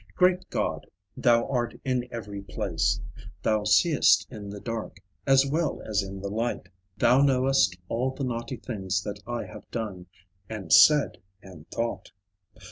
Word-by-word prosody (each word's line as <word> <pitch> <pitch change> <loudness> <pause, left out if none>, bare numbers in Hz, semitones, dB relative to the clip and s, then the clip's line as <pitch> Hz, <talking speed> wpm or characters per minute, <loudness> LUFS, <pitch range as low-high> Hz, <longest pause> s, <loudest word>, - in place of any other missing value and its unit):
Great 180 0 +2
God, - - -2 0.3
Thou 115 -2 +3
art 120 -3 -2
in 125 -2 0
every 105 -3 -6
place; 100 -5 -1 0.4
Thou 110 -1 +1
seest 145 - +4
in 105 -4 -8
the 100 0 -7
dark, 115 0 -5 0.3
As 135 0 +5
well 155 +4 -1
as 105 -2 +1
in 95 0 -7
the 100 - -4
light; 115 +4 -3 0.3
Thou 125 +3 +4
knowest 130 -9 +3
all 125 +6 0
the 130 +1 -5
naughty 120 0 -3
things 95 -5 -3
That 105 0 -5
I 120 -1 -3
have 105 0 -12
done, 100 -6 -5 0.4
and 95 -8 -2
said, 150 - +6 0.2
and 90 -5 -13
thought. 115 -5 -3
115 Hz, 150 wpm, -27 LUFS, 100-130 Hz, 0.4 s, said